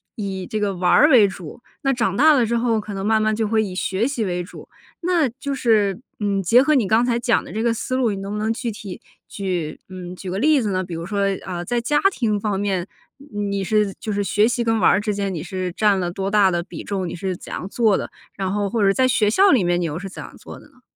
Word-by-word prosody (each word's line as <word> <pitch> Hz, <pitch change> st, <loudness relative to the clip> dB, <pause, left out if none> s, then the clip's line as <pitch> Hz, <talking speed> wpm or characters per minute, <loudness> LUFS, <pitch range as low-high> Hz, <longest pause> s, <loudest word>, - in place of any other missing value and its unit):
以 195 Hz, -3 st, -4 dB
这 215 Hz, -, -3 dB
个 200 Hz, -1 st, 0 dB
玩 180 Hz, 0 st, 0 dB
儿 295 Hz, -, +6 dB
为 230 Hz, -7 st, +6 dB
主， 185 Hz, +1 st, -9 dB, 0.2 s
那 270 Hz, -, +1 dB
长 220 Hz, -7 st, 0 dB
大 310 Hz, +6 st, +6 dB
了 255 Hz, -6 st, +4 dB
之 235 Hz, +2 st, 0 dB
后， 230 Hz, -2 st, +1 dB
可 210 Hz, -1 st, -7 dB
能 195 Hz, 0 st, -4 dB
慢 220 Hz, 0 st, +3 dB
慢 215 Hz, 0 st, +1 dB
就 220 Hz, 0 st, 0 dB
会 220 Hz, +1 st, +1 dB
以 195 Hz, -4 st, -4 dB
学 195 Hz, +4 st, 0 dB
习 265 Hz, -5 st, -2 dB
为 180 Hz, -2 st, -2 dB
主。 175 Hz, -, -11 dB, 0.3 s
那 340 Hz, -4 st, +2 dB
就 275 Hz, +4 st, -5 dB
是， 215 Hz, -7 st, +2 dB, 0.2 s
嗯， 200 Hz, -1 st, 0 dB
结 230 Hz, +8 st, +5 dB
合 305 Hz, +2 st, +2 dB
你 240 Hz, -8 st, +2 dB
刚 225 Hz, +4 st, +3 dB
才 240 Hz, -1 st, 0 dB
讲 240 Hz, -1 st, +1 dB
的 -, -, -11 dB
这 220 Hz, -, -3 dB
个 235 Hz, 0 st, +2 dB
思 255 Hz, +3 st, -3 dB
路， 245 Hz, -4 st, +1 dB
你 200 Hz, -, -4 dB
能 195 Hz, +1 st, -6 dB
不 210 Hz, -, -3 dB
能 220 Hz, +2 st, 0 dB
具 240 Hz, -1 st, -4 dB
体 205 Hz, -3 st, -9 dB, 0.3 s
举 180 Hz, -6 st, -3 dB
嗯， 180 Hz, -1 st, -8 dB
举 185 Hz, 0 st, -7 dB
个 190 Hz, -, -2 dB
例 300 Hz, +2 st, +4 dB
子 210 Hz, -3 st, -1 dB
呢？ 185 Hz, 0 st, -1 dB
比 175 Hz, -, -8 dB
如 165 Hz, -, -5 dB
说 200 Hz, +2 st, -3 dB, 0.3 s
啊 175 Hz, -2 st, -5 dB
在 240 Hz, +3 st, -1 dB
家 295 Hz, +5 st, +1 dB
庭 220 Hz, -, 0 dB
方 205 Hz, -1 st, -1 dB
面， 195 Hz, -2 st, -1 dB, 0.3 s
你 275 Hz, -7 st, -7 dB
你 200 Hz, -1 st, -2 dB
是 210 Hz, 0 st, +1 dB
就 215 Hz, -, -4 dB
是 205 Hz, 0 st, 0 dB
学 200 Hz, +3 st, +2 dB
习 240 Hz, 0 st, 0 dB
跟 225 Hz, -1 st, +1 dB
玩 -, -, +5 dB
儿 200 Hz, -, +2 dB
之 210 Hz, -1 st, -1 dB
间， 200 Hz, -1 st, -2 dB
你 165 Hz, -, -4 dB
是 185 Hz, 0 st, -4 dB
占 205 Hz, -2 st, +2 dB
了 175 Hz, -1 st, -2 dB
多 195 Hz, +2 st, -3 dB
大 200 Hz, -2 st, +4 dB
的 175 Hz, -, 0 dB
比 185 Hz, -, -9 dB
重？ 190 Hz, -3 st, -3 dB
你 -, -, -6 dB
是 185 Hz, +1 st, -3 dB
怎 -, -, -11 dB
样 180 Hz, -, -5 dB
做 215 Hz, -1 st, +2 dB
的？ -, -, -5 dB, 0.2 s
然 190 Hz, -1 st, -2 dB
后 205 Hz, -1 st, -1 dB
或 220 Hz, +1 st, 0 dB
者 195 Hz, -, +4 dB
在 260 Hz, +3 st, +3 dB
学 235 Hz, -4 st, +2 dB
校 390 Hz, -, +4 dB
里 240 Hz, -8 st, +4 dB
面 175 Hz, 0 st, +1 dB
你 -, -, 0 dB
又 155 Hz, -1 st, -3 dB
是 195 Hz, +2 st, -6 dB
怎 -, -, -9 dB
样 -, -, -11 dB
做 -, -, -11 dB
的 -, -, -17 dB
呢？ 260 Hz, -3 st, -26 dB
205 Hz, 300 characters per minute, -21 LUFS, 190-235 Hz, 0.3 s, 儿